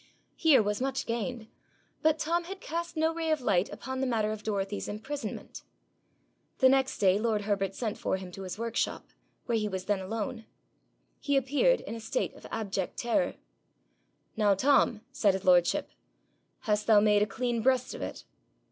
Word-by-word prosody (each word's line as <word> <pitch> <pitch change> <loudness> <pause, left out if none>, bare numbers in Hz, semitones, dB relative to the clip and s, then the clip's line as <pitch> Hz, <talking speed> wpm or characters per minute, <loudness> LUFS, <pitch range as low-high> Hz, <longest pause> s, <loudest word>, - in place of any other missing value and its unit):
Here 305 -8 +5
was 210 +2 -1
much 265 0 -1
gained, 230 0 -3 0.5
but 315 0 +3
Tom 340 +2 0
had 385 +2 -7
cast 340 0 -4
no 320 +1 +2
ray 325 -1 -2
of 310 -1 +2
light 200 -6 +1
upon 260 0 -5
the 265 - +1
matter 220 -3 +1
of 215 -1 -5
Dorothy's 205 -1 -2
imprisonment. 245 +8 -6 1.0
The 260 - +6
next 265 0 +2
day 195 0 +4
lord 215 -2 0
Herbert 195 -2 -1
sent 220 -4 -3
for - - 0
him 185 -1 -8
to 195 - -9
his 185 0 -6
workshop, 230 0 -2 0.4
where 235 -2 +1
he 210 - -1
was 190 -1 -4
then 205 -1 +1
alone. 220 +3 -4 0.7
He 285 -1 +1
appeared 290 - +3
in - - -7
a 230 - -5
state 365 - -2
of - - -12
abject 195 -4 -3
terror. 240 +4 0 1.0
'Now, 210 -3 +3
Tom,' 240 -1 +3
said 205 -7 +2
his 190 - -5
lordship, 180 -2 +3 0.7
'hast 210 -2 0
thou 215 -2 +7
made 210 0 +4
a 210 - +3
clean 240 +1 -1
breast 255 +1 +2
of - - -7
it?' - - -6
225 Hz, 175 wpm, -29 LUFS, 205-270 Hz, 1.0 s, thou